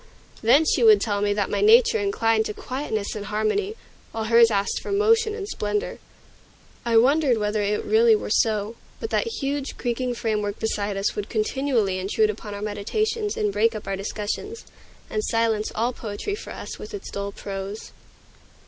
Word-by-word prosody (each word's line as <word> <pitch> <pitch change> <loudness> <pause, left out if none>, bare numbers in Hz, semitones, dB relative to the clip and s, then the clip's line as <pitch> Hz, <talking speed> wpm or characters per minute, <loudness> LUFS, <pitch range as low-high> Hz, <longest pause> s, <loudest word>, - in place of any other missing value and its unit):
Then 265 +8 +5
she - - +2
would 435 -2 +7
tell 205 -2 -1
me 205 0 +1
that 205 -1 -1
my - - 0
nature 460 +2 +6
inclined 225 - +1
to 210 - -5
quietness 250 -6 -3
and 205 -1 -5
harmony, 220 - -1 0.4
while 225 - -3
hers 230 +1 +6
asked 200 -2 0
for - - -6
motion 435 +1 +3
and 405 -3 -5
splendor. 210 - -3 0.8
I 235 -1 +2
wondered 270 +1 +4
whether 210 0 0
it 205 +1 0
really 225 +1 +5
were 210 - -4
so. 215 0 +1 0.2
But 450 - -5
that - - +1
huge, 285 -9 -3
creaking 245 0 -2
framework 210 -3 -2
beside 205 -2 -2
us 195 +1 -1
would 205 0 -4
continually 220 -3 0
intrude 425 - +1
upon 210 - -8
our 200 - -6
meditations 415 - -2
and 210 -1 0
break 225 +3 +2
up 215 - -6
our 195 - -1
discussions, 210 - -5 0.4
and 430 - -2
silence 225 - 0
all 235 +3 0
poetry 225 - -5
for 415 - -7
us - - -7
with - - -7
its 405 - -8
dull 200 0 -4
prose. 200 +1 -6
225 Hz, 175 wpm, -24 LUFS, 210-305 Hz, 0.8 s, would